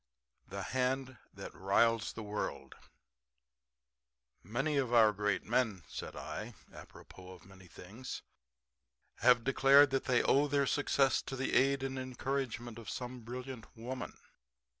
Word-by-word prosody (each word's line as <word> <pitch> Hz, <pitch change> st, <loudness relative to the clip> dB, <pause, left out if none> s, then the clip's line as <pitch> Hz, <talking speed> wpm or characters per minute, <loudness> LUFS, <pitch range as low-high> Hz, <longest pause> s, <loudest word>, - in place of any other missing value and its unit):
THE 100 Hz, 0 st, -5 dB
HAND 130 Hz, +2 st, -1 dB
THAT -, -, -9 dB
RILES 110 Hz, +3 st, +2 dB
THE 110 Hz, -, -7 dB
WORLD 105 Hz, 0 st, -4 dB, 1.7 s
"Many 135 Hz, +7 st, -1 dB
of 130 Hz, -3 st, 0 dB
our 110 Hz, -3 st, +6 dB
great 105 Hz, -1 st, 0 dB
men," 110 Hz, -6 st, 0 dB
said -, -, -7 dB
I 110 Hz, +1 st, -6 dB, 0.2 s
(apropos 95 Hz, 0 st, -12 dB
of 90 Hz, -, -16 dB
many 95 Hz, -1 st, -15 dB
things), 100 Hz, +9 st, -9 dB, 0.9 s
"have 125 Hz, -2 st, +5 dB
declared 135 Hz, +1 st, +6 dB
that 135 Hz, -, 0 dB
they 125 Hz, -2 st, +3 dB
owe 145 Hz, +2 st, +4 dB
their 140 Hz, 0 st, +2 dB
success 135 Hz, -1 st, +2 dB
to 135 Hz, -, -6 dB
the 135 Hz, +1 st, -2 dB
aid 135 Hz, +1 st, +3 dB
and 135 Hz, 0 st, -3 dB
encouragement 130 Hz, -3 st, -4 dB
of 115 Hz, -, -9 dB
some 125 Hz, 0 st, -5 dB
brilliant 125 Hz, +1 st, -7 dB
woman." 125 Hz, +3 st, -6 dB
125 Hz, 135 wpm, -33 LUFS, 110-135 Hz, 1.7 s, our